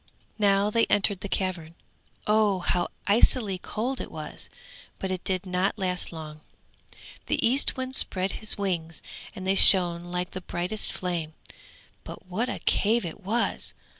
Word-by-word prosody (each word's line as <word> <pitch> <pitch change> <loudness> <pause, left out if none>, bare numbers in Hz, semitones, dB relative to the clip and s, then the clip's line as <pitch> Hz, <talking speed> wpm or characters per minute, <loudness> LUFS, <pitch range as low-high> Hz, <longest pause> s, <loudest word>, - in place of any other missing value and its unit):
Now 200 0 +3
they 230 +1 +2
entered 200 -1 +2
the 200 - -6
cavern. 175 -5 -3 0.5
Oh, 210 -2 +3
how 175 0 +1 0.2
icily 205 -2 +2
cold 245 +8 -3
it - - -6
was; - - -9 0.5
but 190 - -4
it 185 -1 -4
did 185 0 -2
not 185 +3 -1
last 180 -2 -2
long. 155 -2 -9 0.9
The - - +1
Eastwind 260 0 0
spread 190 -6 0
his 215 - +2
wings, 170 -5 -3 0.3
and 185 - -7
they 190 - +2
shone 175 -3 +7
like 180 0 -4
the 185 - -6
brightest 180 +5 -1
flame; 170 -4 -4 0.7
but - - -10
what 205 +7 -2
a - - -3
cave 220 0 +2
it 170 +4 -7
was! 225 +5 -1
190 Hz, 150 wpm, -26 LUFS, 180-210 Hz, 0.9 s, shone